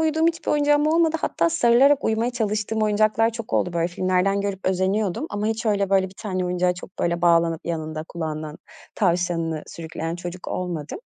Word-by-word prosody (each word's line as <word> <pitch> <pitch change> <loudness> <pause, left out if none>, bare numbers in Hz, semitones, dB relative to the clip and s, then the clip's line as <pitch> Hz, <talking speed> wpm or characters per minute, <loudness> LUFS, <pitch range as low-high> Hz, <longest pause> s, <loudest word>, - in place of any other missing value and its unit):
uyuduğum 320 0 +2
hiçbir 335 0 -1
oyuncağım 295 0 +3
olmadı. 325 0 +3
Hatta 335 - +1
sarılarak 275 0 +4
uyumaya 225 +2 +1
çalıştığım 215 -2 -1
oyuncaklar 215 +2 +2
çok 230 -1 -8
oldu. 180 - +1
Böyle, 170 0 0
filmlerden 185 +2 +1
görüp 200 -1 -4
özeniyordum 190 - 0
ama 205 +1 -2
hiç 225 +1 -2
öyle 200 -2 +1
böyle 190 -1 +3
bir 190 - -17
tane 185 -3 -2
oyuncağa 180 0 +1
çok 180 +1 -12
böyle 170 0 -1
bağlanıp 170 -1 +3
yanında 155 -2 -3
kulağından 155 -2 -5 0.4
tavşanını 170 -4 0
sürükleyen 165 0 -5
çocuk 175 0 -7
olmadım. 170 - -4
190 Hz, 165 wpm, -23 LUFS, 170-225 Hz, 0.4 s, sarılarak